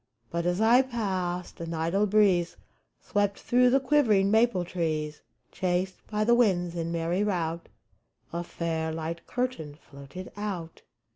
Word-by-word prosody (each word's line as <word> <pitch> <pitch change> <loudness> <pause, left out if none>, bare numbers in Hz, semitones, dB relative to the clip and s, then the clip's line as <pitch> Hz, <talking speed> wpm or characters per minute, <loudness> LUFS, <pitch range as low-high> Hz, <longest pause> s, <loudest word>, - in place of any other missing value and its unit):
But, 170 +1 -1
as 175 +2 0
I 230 +4 +6
passed, 190 -8 -3
an 165 0 -4
idle 170 +6 +1
breeze 190 -4 +3 0.4
Swept 205 -1 0
through 250 +1 +3
the 270 +2 +4
quivering 240 -8 +3
maple 220 -5 +3
trees; 155 -4 -2 0.3
Chased 185 0 -2
by 215 0 -1
the 235 +2 +4
winds 185 -8 +2
in 170 0 -3
merry 170 +3 0
rout, 170 -5 -2 0.6
A 170 0 -2
fair, 165 -2 -3
light 165 +1 -5
curtain 245 -13 -3
floated 140 +4 -11
out. 190 -6 -5
180 Hz, 140 wpm, -28 LUFS, 170-210 Hz, 0.6 s, I